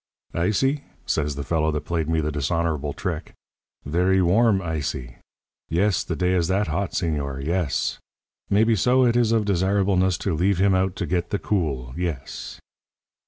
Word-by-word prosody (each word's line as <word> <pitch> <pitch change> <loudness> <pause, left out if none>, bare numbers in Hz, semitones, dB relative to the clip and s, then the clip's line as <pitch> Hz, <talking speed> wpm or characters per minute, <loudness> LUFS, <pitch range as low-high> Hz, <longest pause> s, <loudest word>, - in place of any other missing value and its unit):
"'Ice 90 +8 +1
y?' 140 +2 +1 0.2
says 75 -2 -1
the 70 - -4
fellow 80 0 +1
that 75 -1 -2
played 80 -2 -1
me 80 -1 +2
the 75 0 -1
dishonourable 75 0 -1
trick; - - -4 0.5
'verree 90 +5 +2
warm 100 +4 +4
ice 80 -5 -2
y. - - -9 0.5
Yes. 95 +3 +2
The - - -3
day 90 0 +1
is 85 -3 +2
that 95 0 +1
hot, 85 +4 -2
señor. 70 -5 -2
Yes. 85 -3 -1 0.5
Maybeso 115 +5 +3
it 120 - +2
is 120 -2 +3
of 110 -2 +2
desirableness 95 -1 +2
to 95 - +1
leave 90 +4 +2
him 95 +1 +3
out 95 0 +1
to - - -2
get 85 +1 -1
the 100 - 0
cool. 70 - -2
Yes.' 85 -6 -5
90 Hz, 165 wpm, -24 LUFS, 75-100 Hz, 0.5 s, warm